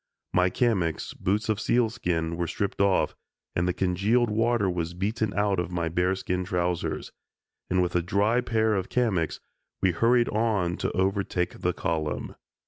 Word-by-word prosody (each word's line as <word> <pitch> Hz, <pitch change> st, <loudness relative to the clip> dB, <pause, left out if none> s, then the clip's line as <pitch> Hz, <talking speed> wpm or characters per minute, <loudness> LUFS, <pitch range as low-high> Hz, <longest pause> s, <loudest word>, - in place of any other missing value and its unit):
My 90 Hz, 0 st, +4 dB
kamiks 95 Hz, -7 st, 0 dB
(boots 105 Hz, +3 st, -1 dB
of 110 Hz, -1 st, 0 dB
sealskin) 90 Hz, -10 st, 0 dB
were 85 Hz, 0 st, -2 dB
stripped 100 Hz, +4 st, -2 dB
off, 100 Hz, -1 st, +2 dB, 0.4 s
and 85 Hz, +1 st, +1 dB
the -, -, +3 dB
congealed 100 Hz, +6 st, +1 dB
water 115 Hz, -1 st, +2 dB
was 85 Hz, -2 st, -2 dB
beaten 105 Hz, +3 st, -1 dB
out 100 Hz, -2 st, +1 dB
of 90 Hz, -, -2 dB
my 85 Hz, -2 st, -1 dB
bearskin 90 Hz, +1 st, 0 dB
trousers, 90 Hz, -2 st, -2 dB, 0.6 s
and 90 Hz, 0 st, +3 dB
with 90 Hz, -, -2 dB
a 90 Hz, -, +3 dB
dry 100 Hz, +7 st, +2 dB
pair 110 Hz, -2 st, +1 dB
of 95 Hz, -2 st, -1 dB
kamiks, 100 Hz, -10 st, 0 dB, 0.4 s
we 95 Hz, -, +3 dB
hurried 120 Hz, +6 st, +3 dB
on 105 Hz, -6 st, +1 dB
to -, -, -1 dB
overtake 95 Hz, -2 st, 0 dB
the 90 Hz, -, 0 dB
column. 80 Hz, -4 st, -2 dB
95 Hz, 155 wpm, -27 LUFS, 90-110 Hz, 0.6 s, My